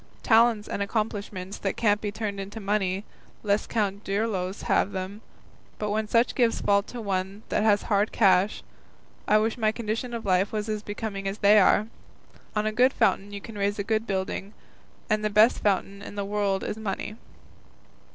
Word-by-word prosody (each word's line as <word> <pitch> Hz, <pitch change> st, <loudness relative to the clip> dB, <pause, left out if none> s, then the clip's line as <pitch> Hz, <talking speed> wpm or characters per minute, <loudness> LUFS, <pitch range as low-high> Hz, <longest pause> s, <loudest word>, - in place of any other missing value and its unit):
Talents 225 Hz, -2 st, +4 dB
and -, -, -3 dB
accomplishments 200 Hz, -2 st, -3 dB
that 195 Hz, -, -2 dB
can't 210 Hz, -2 st, +2 dB
be 205 Hz, -, -2 dB
turned 205 Hz, -1 st, -4 dB
into 200 Hz, +3 st, -6 dB
money, 200 Hz, -1 st, -1 dB, 0.4 s
let 205 Hz, 0 st, 0 dB
Count 205 Hz, -2 st, -1 dB
Dirlos 195 Hz, -2 st, -2 dB
have 205 Hz, -, +1 dB
them; 190 Hz, +3 st, -5 dB, 0.6 s
but 210 Hz, -1 st, -2 dB
when 215 Hz, +1 st, -1 dB
such 230 Hz, +3 st, +2 dB
gifts 235 Hz, -3 st, +2 dB
fall 200 Hz, 0 st, +3 dB
to 240 Hz, +4 st, -9 dB
one 195 Hz, 0 st, -3 dB
that -, -, +1 dB
has 210 Hz, -1 st, +3 dB
hard 205 Hz, 0 st, +1 dB
cash, 195 Hz, -1 st, +3 dB, 0.6 s
I 215 Hz, -, +5 dB
wish 220 Hz, +3 st, 0 dB
my 215 Hz, -1 st, +3 dB
condition 230 Hz, +2 st, -3 dB
of 230 Hz, -, -6 dB
life 190 Hz, +1 st, +2 dB
was 215 Hz, 0 st, -2 dB
as 215 Hz, -1 st, -2 dB
becoming 205 Hz, -2 st, -5 dB
as 195 Hz, +1 st, -3 dB
they 210 Hz, 0 st, +6 dB
are. 205 Hz, +2 st, +4 dB, 0.7 s
On 210 Hz, 0 st, +1 dB
a 215 Hz, -, +1 dB
good 250 Hz, +4 st, +3 dB
foundation 200 Hz, +1 st, +1 dB
you 200 Hz, 0 st, -6 dB
can 215 Hz, -1 st, -9 dB
raise 200 Hz, +1 st, 0 dB
a 200 Hz, -, -1 dB
good 220 Hz, +1 st, -1 dB
building, 195 Hz, +1 st, -3 dB, 0.5 s
and 215 Hz, -1 st, +1 dB
the 215 Hz, -, +1 dB
best 215 Hz, +4 st, +5 dB
foundation 200 Hz, 0 st, 0 dB
in 200 Hz, -, -9 dB
the 200 Hz, -1 st, -2 dB
world 200 Hz, -1 st, 0 dB
is 210 Hz, -, -3 dB
money." 215 Hz, 0 st, -4 dB
205 Hz, 185 wpm, -26 LUFS, 200-220 Hz, 0.7 s, they